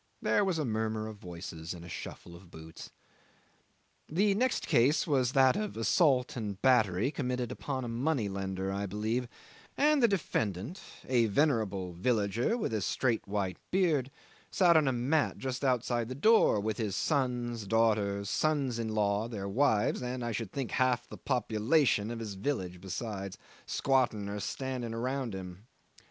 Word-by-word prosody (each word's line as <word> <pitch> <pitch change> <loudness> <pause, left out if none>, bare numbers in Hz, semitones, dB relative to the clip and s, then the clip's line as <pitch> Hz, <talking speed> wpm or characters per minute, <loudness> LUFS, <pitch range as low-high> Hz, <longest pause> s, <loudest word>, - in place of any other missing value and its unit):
There - - +2
was 190 -4 0
a 155 - -1
murmur 110 -1 -1
of 110 -1 -8
voices 85 -2 -7
and 85 -1 -10
a - - -10
shuffle 85 +1 -8
of 90 0 -15
boots. 80 -1 -11 1.2
'The 195 +6 +2
next 250 +5 0
case 130 +7 +3
was 130 -5 +1
that 130 -1 +5
of 210 - -3
assault 125 - +2
and 105 -5 -4
battery 110 -2 +3
committed 125 -4 -2
upon 135 -2 -4
a - - -4
money 120 0 0
lender, 95 -1 -3
I 100 +1 -2
believe; 110 +5 -2 0.5
and 295 0 +4
the 235 - +6
defendant 130 - -2 0.3
a 120 -3 +3
venerable 105 - +1
villager 110 - 0
with 210 - -2
a 110 - 0
straight 120 +3 0
white 100 -3 -2
beard 160 -9 +2 0.4
sat 175 -3 +4
on 155 -3 +5
a - - +3
mat 135 +5 +1
just 130 0 -4
outside 120 -2 0
the 130 - -4
door 215 - +4
with 110 +1 -2
his 105 -4 -1
sons, 120 -6 -1
daughters, 105 -2 +1
sons 140 -3 0
in 115 - -2
law, 105 +1 +1
their 100 -4 -5
wives, 110 0 +2
and, 125 0 -3
I 120 - -2
should 110 -3 -4
think, 135 -4 -4
half 125 0 +1
the - - -9
population 120 -2 +1
of 120 - -4
his 110 -3 -5
village 95 -5 -3
besides, 100 0 -5 0.3
squatting 120 -7 +1
or 105 +1 -4
standing 125 0 -4
around 125 -2 -2
him. 95 +3 -9
115 Hz, 165 wpm, -31 LUFS, 100-135 Hz, 1.2 s, the